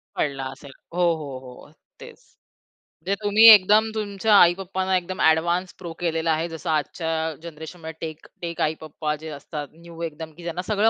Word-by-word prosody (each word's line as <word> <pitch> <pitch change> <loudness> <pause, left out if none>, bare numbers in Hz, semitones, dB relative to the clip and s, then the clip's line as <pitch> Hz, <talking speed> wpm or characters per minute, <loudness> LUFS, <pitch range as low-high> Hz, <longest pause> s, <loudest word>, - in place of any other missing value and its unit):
पडला 135 -2 -1
असेल. 135 +1 -12 0.2
हो, 180 - -1
हो, 150 -3 -7
हो, 125 -1 -13
अ, - - -21 0.3
तेच. - - -12 0.9
ते 195 - +2
तुम्ही 210 +2 +5
एकदम, 210 +3 +5
तुमच्या 210 0 +1
आई-पप्पांना, 190 +1 +2
एकदम 185 +3 -5
ॲडव्हान्स् 170 +3 +2
प्रो 170 -2 -7
केलेला 165 -1 0
आहे. 160 +2 0
जसं 165 +1 -6
आजच्या 160 +2 -1 0.3
जनरेशनमध्ये 160 0 -8
टेक 160 -1 -7 0.2
टेक 170 -1 -4
आई-पप्पा 155 0 -2
जे 160 - -6
असतात, 145 0 -7
न्यू 170 0 -13
एकदम, 160 0 -6
की 175 - -11
ज्यांना 170 +1 -3
सगळं 215 +1 +3
170 Hz, 165 wpm, -24 LUFS, 155-185 Hz, 0.9 s, तुम्ही